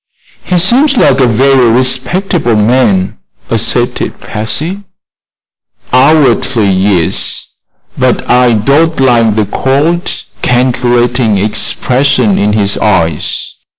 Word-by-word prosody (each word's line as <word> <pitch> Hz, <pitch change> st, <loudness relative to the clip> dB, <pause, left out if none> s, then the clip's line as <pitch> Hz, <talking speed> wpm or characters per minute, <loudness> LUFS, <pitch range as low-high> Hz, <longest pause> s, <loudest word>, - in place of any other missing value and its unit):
"He 180 Hz, -, -1 dB
seems 255 Hz, -, +2 dB
like 135 Hz, -, +3 dB
a 130 Hz, -, +3 dB
very 130 Hz, +1 st, +2 dB
respectable 130 Hz, -, 0 dB
man," 105 Hz, -, 0 dB, 0.3 s
asserted -, -, -1 dB
Patsy. 155 Hz, -, -5 dB, 1.1 s
"Outwardly, 130 Hz, -6 st, +2 dB
yes; 95 Hz, -3 st, 0 dB, 0.5 s
but -, -, -1 dB
I 125 Hz, -1 st, +3 dB
don't 145 Hz, +9 st, +1 dB
like 120 Hz, -5 st, +2 dB
the 110 Hz, -1 st, 0 dB
cold, 145 Hz, -, -1 dB, 0.3 s
calculating 120 Hz, -2 st, 0 dB
expression 125 Hz, +3 st, 0 dB
in 105 Hz, +1 st, 0 dB
his 100 Hz, -2 st, -1 dB
eyes. 85 Hz, -7 st, -1 dB
125 Hz, 95 wpm, -9 LUFS, 105-140 Hz, 1.1 s, like